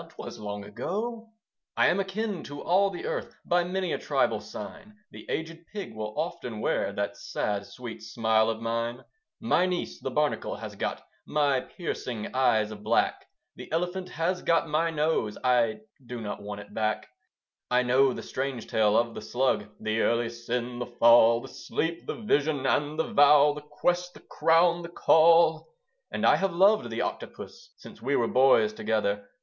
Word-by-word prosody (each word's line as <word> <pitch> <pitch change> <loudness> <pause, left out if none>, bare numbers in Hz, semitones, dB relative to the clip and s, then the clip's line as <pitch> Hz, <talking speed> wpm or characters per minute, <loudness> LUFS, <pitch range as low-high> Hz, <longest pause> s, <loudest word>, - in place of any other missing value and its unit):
'twas - - -8
long 105 -1 -5
ago. 225 - -4 0.5
I - - +5
am 185 - +3
akin 195 0 -2
to 145 0 -8
all 195 +3 +3
the 360 - -7
Earth - - -4
By 175 0 +2
many 185 +1 -2
a - - -2
tribal - - +1
sign: 210 0 -9 0.2
The - - -12
aged 165 +1 -4
Pig 200 - -6
will 105 -1 -6
often 125 -9 -4
wear - - 0
That - - -3
sad, 100 -1 -3
sweet 120 -3 -9
smile 110 0 +1
of 110 0 -3
mine. 115 +2 -2 0.4
My 185 -5 +2
niece, 175 - -3
the - - -3
Barnacle, - - -1
has - - -8
got - - -3 0.2
My 145 -3 +2
piercing 125 - -5
eyes 110 -5 +2
of 105 -1 -9
black; 110 +2 +1 0.3
The - - -11
Elephant 180 +3 -2
has 180 +3 -1
got 165 0 +2
my 160 +2 +1
nose, 150 -9 0
I 125 - +2 0.2
do 125 0 -7
not 105 -2 -5
want 105 0 -6
it 100 - -14
back. 110 0 -1 0.6
I 125 0 +3
know 130 +2 +4
the - - -6
strange 130 -3 -4
tale 105 -1 +2
of 115 0 +1
the - - -7
Slug; 125 -4 0
The 110 +1 -1
Early 115 0 +1
Sin 120 +1 -4
the 125 - -3
Fall 115 -1 +5
The 135 - -9
Sleep 165 +6 -4
the - - -3
Vision 150 -10 0
and 145 +4 +1
the 160 - -2
Vow 145 0 +6
The 150 - -8
Quest 175 +4 -1
the - - -13
Crown 170 +1 +3
the 170 - -7
Call. 165 -1 +4 0.4
And - - -2
I - - +6
have 195 -3 -1
loved 205 +4 +4
the - - -3
Octopus, 480 +1 -7
Since - - -13
we 140 - 0
were 115 - +2
boys 135 - +4
together. 105 - -1
140 Hz, 175 wpm, -27 LUFS, 115-175 Hz, 0.6 s, Vow